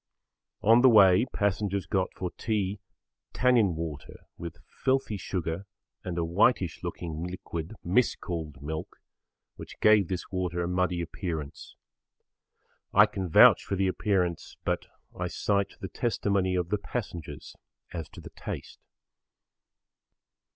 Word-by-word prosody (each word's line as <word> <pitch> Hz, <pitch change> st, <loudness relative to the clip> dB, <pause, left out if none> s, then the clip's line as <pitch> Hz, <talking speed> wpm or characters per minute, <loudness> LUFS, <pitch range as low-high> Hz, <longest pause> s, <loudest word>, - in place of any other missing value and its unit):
On 115 Hz, +3 st, +6 dB
the 130 Hz, -, +8 dB
way 105 Hz, 0 st, +6 dB
passengers 100 Hz, -2 st, 0 dB
got 95 Hz, +2 st, 0 dB
for 90 Hz, -1 st, -4 dB
tea 105 Hz, -3 st, -2 dB, 0.5 s
tannin 120 Hz, -8 st, +3 dB
water 80 Hz, -3 st, -6 dB
with 85 Hz, -2 st, -7 dB
filthy 130 Hz, -4 st, -1 dB
sugar 90 Hz, -1 st, -4 dB, 0.4 s
and 90 Hz, -2 st, -4 dB
a 85 Hz, -, 0 dB
whitish 90 Hz, +1 st, +2 dB
looking 80 Hz, -1 st, -4 dB
liquid 90 Hz, 0 st, -6 dB
mis 100 Hz, +8 st, +2 dB
called 80 Hz, -6 st, -6 dB
milk 80 Hz, +1 st, -5 dB, 0.6 s
which -, -, -10 dB
gave 105 Hz, -4 st, +5 dB
this 90 Hz, +1 st, -4 dB
water 90 Hz, -2 st, -1 dB
a -, -, -2 dB
muddy 90 Hz, -1 st, 0 dB
appearance. 80 Hz, -3 st, -5 dB, 1.2 s
I 105 Hz, +2 st, +7 dB
can 95 Hz, -4 st, -4 dB
vouch -, -, +7 dB
for 100 Hz, -, -2 dB
the 95 Hz, 0 st, +1 dB
appearance, 90 Hz, -3 st, -1 dB
but -, -, -1 dB, 0.3 s
I 90 Hz, -, -2 dB
cite 100 Hz, +2 st, -1 dB
the -, -, -4 dB
testimony 100 Hz, -5 st, 0 dB
of 90 Hz, -1 st, -1 dB
the 105 Hz, -, 0 dB
passengers 100 Hz, -8 st, -6 dB, 0.4 s
as 80 Hz, -2 st, -5 dB
to -, -, -12 dB
the -, -, -11 dB
taste. -, -, -7 dB
95 Hz, 130 wpm, -28 LUFS, 85-105 Hz, 1.2 s, the